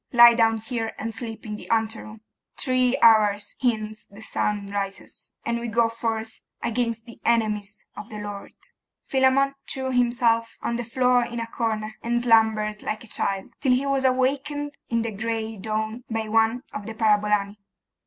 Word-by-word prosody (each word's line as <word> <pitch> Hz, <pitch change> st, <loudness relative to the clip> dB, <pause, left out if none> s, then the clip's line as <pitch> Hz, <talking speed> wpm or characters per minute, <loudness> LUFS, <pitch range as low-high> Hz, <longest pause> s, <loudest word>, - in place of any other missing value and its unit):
Lie 240 Hz, -1 st, +9 dB
down 225 Hz, -1 st, +3 dB
here 225 Hz, 0 st, -3 dB
and 225 Hz, +1 st, -4 dB
sleep 225 Hz, -1 st, -6 dB
in 210 Hz, -1 st, -5 dB
the -, -, -11 dB
anteroom. 220 Hz, -1 st, -1 dB, 0.4 s
Three 255 Hz, -1 st, +2 dB
hours 210 Hz, -2 st, +5 dB
hence 215 Hz, -3 st, -1 dB
the 205 Hz, +2 st, -13 dB
sun 210 Hz, -2 st, -1 dB
rises, 200 Hz, -1 st, -5 dB
and 235 Hz, 0 st, 0 dB
we 235 Hz, -, -4 dB
go 230 Hz, 0 st, +2 dB
forth 225 Hz, -1 st, -4 dB, 0.2 s
against 230 Hz, -1 st, -1 dB
the 235 Hz, -, -13 dB
enemies 210 Hz, -3 st, 0 dB
of 210 Hz, -, -8 dB
the 215 Hz, -, -7 dB
Lord.' 205 Hz, -1 st, -7 dB, 0.5 s
Philammon 270 Hz, +1 st, +3 dB, 0.2 s
threw 265 Hz, -1 st, -2 dB
himself 235 Hz, -2 st, +2 dB
on 235 Hz, -, -2 dB
the 240 Hz, -, -3 dB
floor 250 Hz, +1 st, +3 dB
in 235 Hz, 0 st, -5 dB
a 230 Hz, -, -2 dB
corner, 220 Hz, -2 st, -3 dB
and 240 Hz, +1 st, 0 dB
slumbered 220 Hz, -3 st, +3 dB
like 215 Hz, +2 st, -3 dB
a -, -, -13 dB
child, 195 Hz, +2 st, -2 dB
till 260 Hz, -3 st, +4 dB
he 260 Hz, +3 st, +1 dB
was 275 Hz, -1 st, +1 dB
awakened 275 Hz, +3 st, +1 dB, 0.2 s
in 230 Hz, -1 st, +1 dB
the 230 Hz, -, -3 dB
gray 225 Hz, +1 st, -3 dB
dawn 220 Hz, +3 st, -3 dB
by 225 Hz, -1 st, -2 dB
one 225 Hz, +3 st, +2 dB
of 205 Hz, 0 st, -6 dB
the 225 Hz, -, -6 dB
parabolani. 210 Hz, -1 st, +2 dB
225 Hz, 170 wpm, -25 LUFS, 215-240 Hz, 0.5 s, Lie